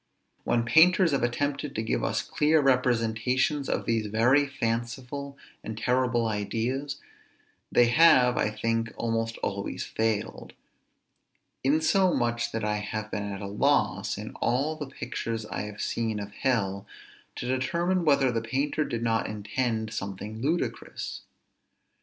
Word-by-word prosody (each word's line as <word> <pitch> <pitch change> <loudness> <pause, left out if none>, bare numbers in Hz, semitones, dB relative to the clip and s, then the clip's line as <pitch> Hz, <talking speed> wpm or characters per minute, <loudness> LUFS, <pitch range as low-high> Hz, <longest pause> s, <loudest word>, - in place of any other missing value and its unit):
When 120 -1 +1
painters 175 +5 +5
have 140 - +1
attempted 140 +4 -1
to 110 - -1
give 110 - -1
us - - 0
clear 155 +1 +2
representations 125 +1 +1
of - - -1
these 115 -2 0
very 125 +7 +3
fanciful 130 +3 -3 0.3
and 110 -1 -6
terrible 125 0 +1
ideas, 115 +7 -2 0.7
they 120 - +5
have, 125 -1 +6
I - - +1
think, 115 +1 -1
almost 115 0 -1
always - - -3
failed; 110 -1 -2 1.1
insomuch 145 - +2
that 115 -1 -3
I 105 0 0
have 110 +1 -4
been 105 0 -3
at 100 - -6
a - - -4
loss, 100 +1 +1
in - - -6
all 140 +6 +1
the 150 -2 -6
pictures 115 -4 -4
I 105 - -4
have 105 0 -6
seen 110 -2 -1
of 100 0 -6
hell, 100 -4 -1 0.5
to - - -5
determine 170 +8 0
whether 140 -4 +4
the 115 -1 -1
painter 135 +6 -1
did 115 -5 -3
not 115 -1 +1
intend 110 +1 -2
something 105 +2 -5
ludicrous. 160 +6 -3
120 Hz, 135 wpm, -27 LUFS, 110-140 Hz, 1.1 s, have